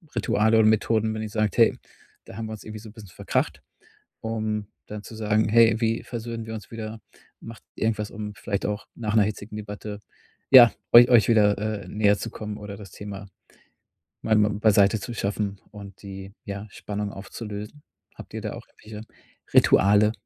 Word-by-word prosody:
Rituale 110 0 +2
und 110 0 +6
Methoden, 110 0 +1
wenn 110 - -4
ihr 110 - -5
sagt: 110 +1 -1
„Hey, 115 - +5 0.5
da 95 - -11
haben 115 - -4
wir 110 - -6
uns 110 - -9
irgendwie 110 0 -8
so 110 - -11
'n 105 - -15
bisschen 105 -5 -12
verkracht.“, - - -2 0.6
um 110 -2 -3 0.2
dann 105 0 -7
zu 110 - -11
sagen: 110 0 +1
„Hey, 115 0 +5
wie 115 0 0
versöhnen 115 -1 -6
wir 110 - -6
uns 105 -3 -9
wieder." 110 -1 -7 0.4
Macht 115 0 -11
irgendwas, 105 -2 -1
um 105 0 -6
vielleicht 100 -1 -3
auch 105 0 -4
nach 110 -2 -3
'ner 110 - +6
hitzigen 105 0 -5
Debatte, 105 0 -7 0.5
ja, 120 -3 +10 0.2
euch 120 +1 +9
euch 120 -3 +6
wieder, 105 -3 +4 0.3
äh, - - -13
näher 105 -1 +2
zu 115 - -5
kommen 105 -2 -7
oder 105 -1 -8
das 100 -3 -11
Thema 100 +1 -8 1.0
mal 110 - +2
mal 105 0 +4
beiseite 105 0 +3
zu 120 +4 -6
schaffen 100 -2 -2
und 100 -2 -11
die, 95 0 -9
ja, 100 +1 -6
Spannung 105 -1 -5
aufzulösen? 105 +6 -8 0.3
Habt - - -12
ihr - - -5
da - - -4
auch - - -10
irgendwelche 105 0 -11 0.5
Rituale? 105 +2 +5
105 Hz, 185 wpm, -25 LUFS, 105-110 Hz, 1.0 s, ja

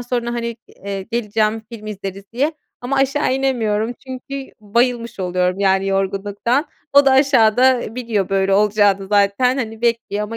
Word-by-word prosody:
sonra 240 -1 -2
hani, 235 -1 -3
eee, 195 -1 -6
geleceğim, 220 0 -1
film 215 -2 -9
izleriz 195 -2 -6
diye 280 +7 0 0.3
ama 250 +3 -2
aşağı 270 0 +1
inemiyorum 235 -4 0
çünkü 265 +1 -7
bayılmış 235 +1 0
oluyorum 180 0 0
yani, 195 0 +2
yorgunluktan. 200 - -1 0.2
O 280 0 +6
da 265 - +6
aşağıda, 260 -2 +4
eee, 220 - -7
biliyor 230 -6 -1
böyle 195 0 +1
olacağını 205 -1 +3
zaten 205 +6 +2
hani, 225 -3 -4
bekliyor 230 -3 0
ama 225 +2 -6
225 Hz, 150 wpm, -19 LUFS, 200-250 Hz, 0.3 s, O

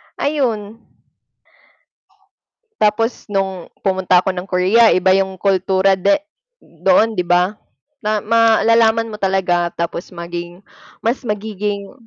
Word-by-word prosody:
ayun. 230 -7 -2 2.0
Tapos 225 +2 0
nung 190 -3 -3 0.2
pumunta 185 -1 +2
ako 190 - 0
ng 185 +1 -7
Korea, 195 +6 +4
iba 185 +1 +3
yung 190 0 0
kultura 190 0 +1
de 295 +10 +3 0.6
doon 225 -5 +3
'di 180 -5 -3
ba? 180 +2 +3 0.5
Na 215 -2 -2
malalaman 230 0 +3
mo 210 - -9
talaga 180 -3 +1
tapos 170 +1 -4
maging 175 +1 -8 0.4
mas 235 +4 0
magiging 210 -3 -4
195 Hz, 110 wpm, -18 LUFS, 185-220 Hz, 2.0 s, Korea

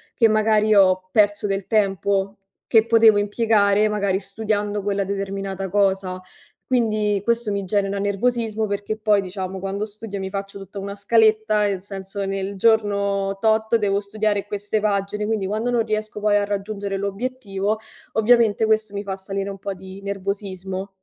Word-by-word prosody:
che 225 -2 +4
magari 215 0 +3
ho 185 -1 +4
perso 205 -1 +3
del 195 -1 -2
tempo, 200 -1 +1 0.3
che 220 -1 +5
potevo 225 -2 +6
impiegare 205 0 +2
magari 200 -2 0
studiando 205 0 -2
quella 200 0 -1
determinata 195 0 -4
cosa. 190 -1 0 0.4
Quindi, 215 -5 +1
questo 235 -1 0
mi 200 -1 -2
genera 200 +1 0
nervosismo 220 +2 0
perché 205 +1 -3
poi, 210 -2 +3
diciamo, 190 0 -5
quando 195 +2 -3
studio 215 -1 -8
mi 190 -1 -4
faccio 195 0 -5
tutta 195 +1 -8
una 200 +1 -5
scaletta, 215 0 +3
nel 195 -2 -3
senso 195 0 -6
nel 195 +1 -3
giorno 200 -2 +1
tot 220 +1 +2
devo 200 -3 +2
studiare 205 0 -1
queste 205 +1 -2
pagine, 210 0 -1
quindi 215 -3 -1
quando 215 +5 -1
non 235 -2 +1
riesco 215 -1 -3
poi 210 0 +2
a 205 - +1
raggiungere 200 0 -3
l'obiettivo, 200 0 -2 0.4
ovviamente, 225 -1 +4
questo 215 -1 +1
mi 200 - -3
fa 195 -2 -4
salire 195 +1 -4
un 195 - -9
po' 200 0 -4
di 190 +1 -11
nervosismo. 195 -1 -4
205 Hz, 155 wpm, -22 LUFS, 195-215 Hz, 0.4 s, potevo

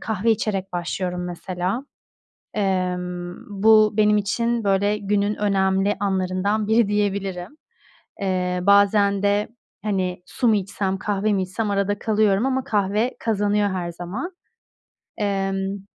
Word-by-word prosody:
kahve 220 0 0
içerek 195 -3 -1
başlıyorum 180 +1 -3
mesela. 180 +6 -3 0.7
Emm, 180 -3 -2 0.3
bu 215 -1 +6
benim 210 0 +4
için, 230 +3 0
böyle, 200 +1 +2
günün 205 0 0
önemli 195 0 +1
anlarından 195 +2 0
biri 220 -1 +4
diyebilirim. 200 +2 -2 0.6
Eee, 180 -2 0
bazen 200 0 +4
de, 205 +1 +2 0.4
hani, 185 -4 -2
su 245 - -1
mu 220 - +5
içsem, 195 -1 -2
kahve 205 +1 0
mi 190 -1 +1
içsem 205 +3 -3
arada 200 0 0
kalıyorum 215 0 +2
ama 265 0 0
kahve 210 +3 0
kazanıyor 205 -2 +1
her 180 -2 -3
zaman. 185 - -5 0.9
Emm. 195 -1 -2
200 Hz, 120 wpm, -23 LUFS, 190-210 Hz, 0.9 s, bu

